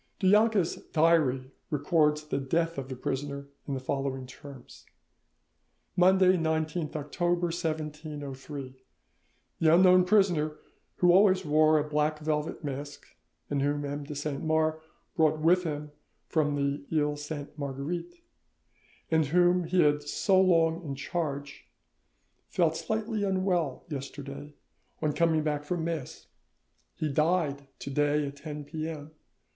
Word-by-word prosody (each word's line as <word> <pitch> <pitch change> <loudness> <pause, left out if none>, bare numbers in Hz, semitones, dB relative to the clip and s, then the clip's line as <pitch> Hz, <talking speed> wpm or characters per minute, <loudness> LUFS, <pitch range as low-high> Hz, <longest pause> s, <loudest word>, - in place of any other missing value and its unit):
Du 195 - -3
Jonca's 210 -4 +3 0.2
diary 150 -5 +3 0.2
records 150 0 +2
the 145 - -1
death 165 +3 0
of 135 0 -7
the 130 - -4
prisoner 140 +2 -4 0.2
in 140 - -2
the - - -3
following 135 0 -3
terms:— 130 0 -12 1.1
"Monday, 185 0 +5
19th 160 -1 -1
November 175 +4 0
1703. 150 -5 -5 0.8
The 160 0 +5
unknown 185 0 +6
prisoner, 175 -6 +2 0.4
who 175 -1 +4
always 185 0 +5
wore 155 +1 +4
a 150 0 0
black 150 +1 0
velvet 155 +2 -2
mask, 145 0 -7 0.3
and 140 -1 -1
whom 145 +1 0
M. 145 +1 -4
de 145 +1 -7
Saint 145 -1 -3
Mars 160 0 +1 0.3
brought 155 -3 +3
with 175 +4 +3
him 150 -1 -4 0.4
from 150 -3 +1
the 140 0 -1
Iles 150 -2 0
Sainte 145 -1 -6
Marguerite, 155 - -5 0.9
and 160 -2 +3
whom 175 +3 +3
he 175 +1 +3
had 150 0 +3
so 190 +6 +2
long 165 -2 +3
in 140 -4 -4
charge, 140 -2 -4 0.8
felt 165 -3 +1
slightly 220 +2 -2
unwell 185 -7 0
yesterday 140 0 -7 0.4
on 150 -1 0
coming 160 -1 +2
back 150 -1 -1
from 165 +2 -2
mass. 160 -5 -4 0.7
He 155 - -2
died 150 -2 0
to 140 - -7
day 145 +1 +2
at 140 0 -7
10 150 0 -7
p.m. 155 -1 -6
155 Hz, 130 wpm, -29 LUFS, 145-170 Hz, 1.1 s, unknown